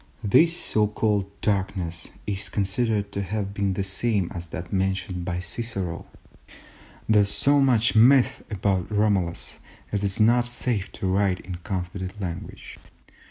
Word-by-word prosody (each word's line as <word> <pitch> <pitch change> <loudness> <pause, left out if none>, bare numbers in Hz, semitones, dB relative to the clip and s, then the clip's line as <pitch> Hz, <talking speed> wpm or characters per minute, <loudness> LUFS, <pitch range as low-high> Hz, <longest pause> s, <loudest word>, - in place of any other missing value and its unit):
This 165 - +4
so 105 -9 +1
called 105 -2 0
darkness 95 -5 -2 0.2
is 100 -1 -2
considered 100 +1 0
to 100 - -2
have 100 +1 -3
been 100 -1 0
the 95 - -2
same 100 -1 0
as 85 -1 -7
that 90 +3 -7
mentioned 95 -2 -1
by 90 0 -2
Cicero. 90 -1 -4 1.0
There 110 -1 +5
is 100 - +1
so 140 +6 +3
much 120 -6 +4
myth 125 +3 +5
about 95 -3 0
Romulus 95 - 0 0.3
that 105 - 0
it 100 - -3
is 100 0 0
not 120 +2 +4
safe 120 -4 -2
to 100 - -5
write 95 0 +1
in 90 -2 -7
confident 95 +2 -5
language. 90 -4 -7
100 Hz, 150 wpm, -25 LUFS, 95-110 Hz, 1.0 s, There